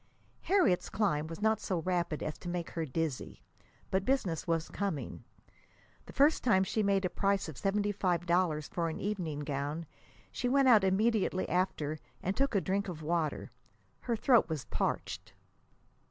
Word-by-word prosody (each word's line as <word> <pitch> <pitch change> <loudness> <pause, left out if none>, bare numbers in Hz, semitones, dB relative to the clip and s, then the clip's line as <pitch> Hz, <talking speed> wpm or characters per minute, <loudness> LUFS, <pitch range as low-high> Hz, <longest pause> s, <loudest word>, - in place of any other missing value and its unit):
Harriet's 360 - +2
climbing 180 -8 0
was 165 +5 -7
not 220 -1 +3
so 185 - -2
rapid 175 -3 -1
as 155 - -3
to 175 - -7
make 175 -1 -3
her 165 -1 -2
dizzy; 155 -1 -3 0.5
but 190 0 +1
business 195 - 0
was 165 -1 0
coming. 195 -8 -4 0.8
The - - -10
first 290 +3 +4
time 190 -6 +4
she 215 +3 0
made 200 -2 +2
a - - +1
price 195 -2 +1
of 160 - -7
seventy 205 +6 0
five 180 -4 0
dollars 170 -3 +1
for 170 -2 -2
an 160 - -5
evening 175 -8 -2
gown, 145 +3 -3 0.5
she 245 - -1
went 275 +1 +4
out 220 -5 +7
immediately 195 0 +2
after 155 -4 -1 0.2
and 190 +2 -1
took 275 -4 +1
a 200 - +3
drink 200 +2 -1
of 160 -4 -6
water. 160 -1 -1 0.5
Her 235 - -1
throat 235 - +4
was 155 -4 -3
parched. - - -3
185 Hz, 170 wpm, -32 LUFS, 160-205 Hz, 0.8 s, out